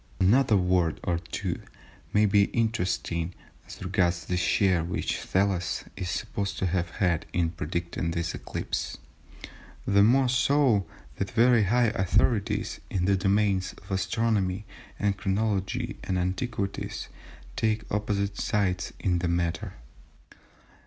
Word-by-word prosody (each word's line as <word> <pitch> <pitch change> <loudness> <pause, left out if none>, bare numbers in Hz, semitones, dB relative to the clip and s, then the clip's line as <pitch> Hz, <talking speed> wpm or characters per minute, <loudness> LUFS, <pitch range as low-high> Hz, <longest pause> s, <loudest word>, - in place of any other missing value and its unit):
Another 110 +3 +4
word 90 -3 +1
or 85 -1 0
two - - -4 0.5
may 105 +1 +4
be 100 0 +4
interesting 95 -7 -1 0.3
as - - -9
regards 90 -2 +1
the 90 - -1
share 90 -1 +2
which 85 - -2
Thales 95 -2 0
is 90 - -4
supposed 100 +2 -3
to - - -1
have 90 -1 0
had 85 -2 0
in 85 -2 +1
predicting 85 +1 -3
this 85 0 -2
eclipse, - - -4 0.9
the 100 0 +4
more 130 +5 +5
so, 130 - +3 0.3
that 100 - -2
very 120 -2 +4
high 120 +3 +3
authorities 100 +2 +1
in 90 -2 0
the 100 +1 +3
domains 95 -1 +1
of - - -14
astronomy, 95 0 0 0.3
and 100 -2 0
chronology, 105 +4 -1
and 95 - -1
antiquities 95 +2 -2 0.5
take 110 -1 0
opposite 100 -1 -1
sides 95 -2 0
in 90 -2 +1
the 90 - -1
matter. 85 -1 -1
95 Hz, 125 wpm, -27 LUFS, 90-105 Hz, 0.9 s, more